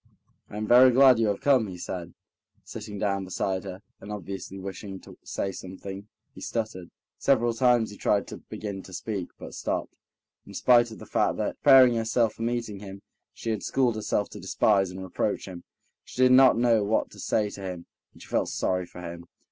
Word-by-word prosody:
"I 105 - -8
am 110 - -2
very 125 +3 +7
glad 130 -1 +6
you 115 - +2
have 100 -1 -1
come," 130 -6 +3
he 90 -2 -8
said, 90 -1 -6 0.5
sitting 105 -1 -8
down 100 -1 -1
beside 95 0 -2
her, 95 0 -8 0.2
and 100 - -9
obviously 95 -1 -6
wishing 95 0 -7
to - - -13
say 95 - -3
something, 95 +2 -8 0.3
he - - -12
stuttered. 110 -6 -4 0.3
Several 120 -3 +2
times 120 -2 +2
he 105 - -11
tried 100 -1 +1
to - - -7
begin 100 -2 -7
to 95 - -13
speak, 95 0 -4
but - - -10
stopped. - - -3 0.5
In 100 - -11
spite 120 +1 +4
of 110 - -10
the - - -11
fact - - 0
that, - - -2
preparing 130 -3 +7
herself 115 -1 +1
for - - -12
meeting 115 -3 -2
him, 100 -1 -10 0.3
she 115 - -4
had 110 - -2
schooled 125 -3 +1
herself 105 -1 -1
to - - -9
despise 100 -3 +2
and 95 +1 -7
reproach 95 +1 -2
him, 90 -2 -9 0.4
she - - -12
did 130 - +6
not 130 -1 +7
know 115 -3 +3
what 105 +2 0
to - - -14
say 105 -2 0
to 100 - -9
him, 90 -3 -6 0.3
and - - -15
she - - -14
felt - - 0
sorry 90 -1 -1
for 90 - -11
him. 85 0 -8
105 Hz, 205 wpm, -26 LUFS, 95-115 Hz, 0.5 s, very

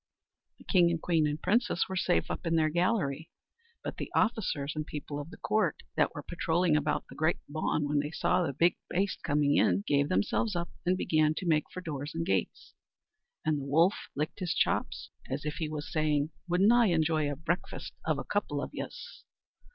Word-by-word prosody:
The - - -16
king 175 -4 +4
and 170 -1 0
queen 160 -2 +2
and 150 +1 -2
princess 230 -1 +1
were 190 - -4
safe 85 - +1
up - - -4
in 165 - +2
their 155 -1 +3
gallery, 170 -4 0 0.5
but - - -5
the - - -5
officers 190 - +1
and 155 - -1
people 145 -1 -6
of 145 +2 -7
the - - -11
court 215 - 0
that - - +2
wor - - -5
padrowling 170 -1 +1
about 150 0 0
the - - -12
great 160 +2 +1
bawn, 150 0 -1
when 145 0 +1
they 145 +1 -1
saw 180 +3 +1
the 165 -5 0
big 170 +6 +2
baste 190 0 -1
coming 145 -1 +2
in, 95 +2 +3
gave 140 0 +2
themselves 180 - +1
up, 170 0 -2 0.2
and 185 +1 +3
began 155 -3 +2
to 185 - -4
make 155 -3 +2
for 185 - -6
doors 145 -3 -5
and 165 0 -1
gates; 95 -2 -2 0.7
and 155 -2 +1
the 135 - -5
wolf 165 +7 +4 0.2
licked 150 +6 -3
his 180 -3 -1
chops, - - 0 0.2
as 140 +3 -3
if 150 - -3
he 155 -2 -2
was 150 -1 -5
saying, 155 -1 +1 0.2
"Wouldn't 190 +5 +5
I 240 -2 +5
enjoy 160 -4 +2
a - - -3
breakfast 165 +5 -3
off - - 0
a - - -3
couple - - -1
of - - -4
yez!" - - -7
155 Hz, 205 wpm, -30 LUFS, 145-175 Hz, 0.7 s, Wouldn't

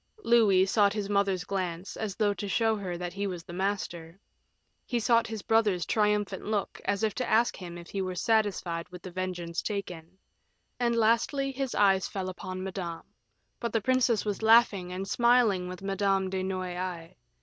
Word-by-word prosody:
Louis 210 - +5
sought 200 0 +3
his 205 -1 -3
mother's 195 -3 +1
glance, 185 -2 -4
as 210 -4 -4
though 210 -2 +2
to 200 0 -5
show 225 +2 +2
her 185 -4 -4
that 175 0 -5
he 200 +1 -2
was 175 -3 -6
master; 175 -2 -3 0.6
he 240 - -1
sought 230 0 +3
his 220 -2 -6
brother's 210 -7 +2
triumphant 210 -2 0
look, 210 -1 -2
as 200 +1 0
if 215 -2 +1
to 250 - -3
ask 230 +2 +3
him 175 -2 -8
if 170 0 -10
he 195 - -2
were 185 -1 -3
satisfied 190 -5 0
with 180 -1 -11
the 185 - -7
vengeance 175 -2 -3
taken; 180 -4 -5 0.6
and 235 -1 +1
lastly, 235 +5 +2
his 270 -1 -3
eyes 195 -2 +3
fell 190 -2 -4
upon 185 0 -6
Madame; 180 -3 -5 0.6
but 235 -2 -3
the 225 - +2
princess 245 -2 +2
was 205 -1 -2
laughing 220 -5 +4
and 190 +2 -4
smiling 235 -5 +3
with 185 +1 -8
Madame 195 -1 0
de 190 -1 -1
Noailles. 185 -2 -4
195 Hz, 175 wpm, -29 LUFS, 180-220 Hz, 0.6 s, Louis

